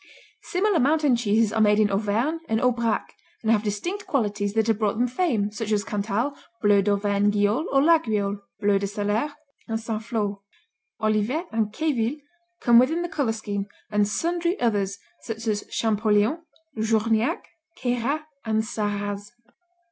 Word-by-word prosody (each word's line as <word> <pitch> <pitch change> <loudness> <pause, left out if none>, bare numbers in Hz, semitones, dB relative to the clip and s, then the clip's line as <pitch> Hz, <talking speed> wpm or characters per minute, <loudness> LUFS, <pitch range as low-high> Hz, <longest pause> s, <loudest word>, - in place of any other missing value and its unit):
Similar 385 -1 +1
mountain 295 -1 +3
cheeses 220 -2 +2
are 225 - +2
made 210 0 +4
in 210 -1 +3
Auvergne 220 +10 0
and 220 0 +2
Aubrac 235 -3 0 0.3
and 220 - +2
have 215 -2 +4
distinct 280 - -3
qualities 205 -6 0
that 220 0 +2
have 225 -2 +1
brought 215 -1 0
them 245 +2 +2
fame, 240 - 0
such 215 +1 -4
as 205 -1 +2
Cantal, 210 +7 -1 0.2
bleu 205 -1 +4
d'Auvergne 200 0 +2
Guiole 205 - +1
or 275 - +4
Laguiole, 215 -11 +2 0.2
bleu 205 -1 +3
de 200 - -2
Salers, 205 +7 -1 0.4
and 225 -1 -2
St. 220 -1 -4
Flour. 210 -3 -2 0.6
Olivet 215 - 0
and 220 -2 0
Queville 265 -1 0 0.4
come 235 -1 +7
within 320 +8 +2
the 345 - -3
color 280 -9 0
scheme, 205 -2 -4 0.2
and 210 -1 +3
sundry 340 - -1
others 200 -4 0 0.2
such 225 0 -6
as 210 -2 -1
Champoléon, 215 +5 +2 0.4
Journiac, 220 +1 +1 0.4
Queyras 245 +5 0 0.2
and 220 -1 +1
Sarraz. 205 -2 -3
220 Hz, 150 wpm, -25 LUFS, 205-245 Hz, 0.6 s, come